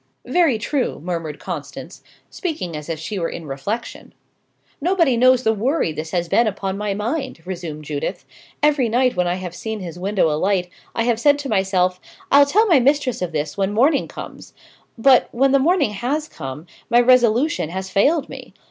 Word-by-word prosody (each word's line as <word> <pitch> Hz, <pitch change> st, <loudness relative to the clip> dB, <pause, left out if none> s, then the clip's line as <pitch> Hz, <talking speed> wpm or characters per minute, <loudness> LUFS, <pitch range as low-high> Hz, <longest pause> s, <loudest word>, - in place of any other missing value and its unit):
"Very 275 Hz, -2 st, +2 dB
true," 255 Hz, +4 st, -2 dB
murmured 165 Hz, -3 st, -4 dB
Constance, -, -, -7 dB, 0.3 s
speaking 205 Hz, -, -4 dB
as 150 Hz, +1 st, -7 dB
if 165 Hz, -, -2 dB
she 185 Hz, +6 st, -5 dB
were 165 Hz, -, -1 dB
in 170 Hz, -, -7 dB
reflection. 175 Hz, +12 st, -5 dB, 0.7 s
"Nobody 335 Hz, -5 st, +2 dB
knows 255 Hz, +1 st, +4 dB
the 220 Hz, -, +3 dB
worry 240 Hz, -, 0 dB
this 155 Hz, +1 st, -6 dB
has 175 Hz, 0 st, -1 dB
been 230 Hz, +7 st, +3 dB
upon 195 Hz, -2 st, -3 dB
my 205 Hz, -1 st, -2 dB
mind," 255 Hz, -, -3 dB
resumed 170 Hz, -5 st, -6 dB
Judith. 145 Hz, -1 st, -4 dB, 0.4 s
"Every 290 Hz, -5 st, +3 dB
night 250 Hz, +2 st, +2 dB
when 180 Hz, -1 st, +1 dB
I 175 Hz, -, 0 dB
have 180 Hz, -2 st, -6 dB
seen 220 Hz, +4 st, -5 dB
his 175 Hz, -2 st, -7 dB
window 190 Hz, -4 st, +1 dB
alight, 180 Hz, +3 st, 0 dB, 0.3 s
I 230 Hz, -, +1 dB
have 235 Hz, -1 st, +1 dB
said 285 Hz, +3 st, +4 dB
to 285 Hz, -1 st, -5 dB
myself, 190 Hz, -3 st, +1 dB, 0.3 s
'I'll 285 Hz, 0 st, +7 dB
tell 425 Hz, +10 st, +3 dB
my 340 Hz, -10 st, +5 dB
mistress 270 Hz, -2 st, +1 dB
of 180 Hz, -2 st, -2 dB
this 150 Hz, 0 st, -3 dB
when 195 Hz, 0 st, +1 dB
morning 275 Hz, +6 st, +3 dB
comes;' -, -, -10 dB, 0.4 s
but, 255 Hz, +2 st, +5 dB
when 270 Hz, +3 st, +2 dB
the 275 Hz, -, +4 dB
morning 300 Hz, -, +2 dB
has 270 Hz, +9 st, -2 dB
come, 135 Hz, -, -8 dB, 0.2 s
my 240 Hz, 0 st, +5 dB
resolution 245 Hz, -, +3 dB
has 190 Hz, +2 st, -5 dB
failed 285 Hz, -, +2 dB
me. -, -, -11 dB
215 Hz, 185 wpm, -21 LUFS, 180-270 Hz, 0.7 s, I'll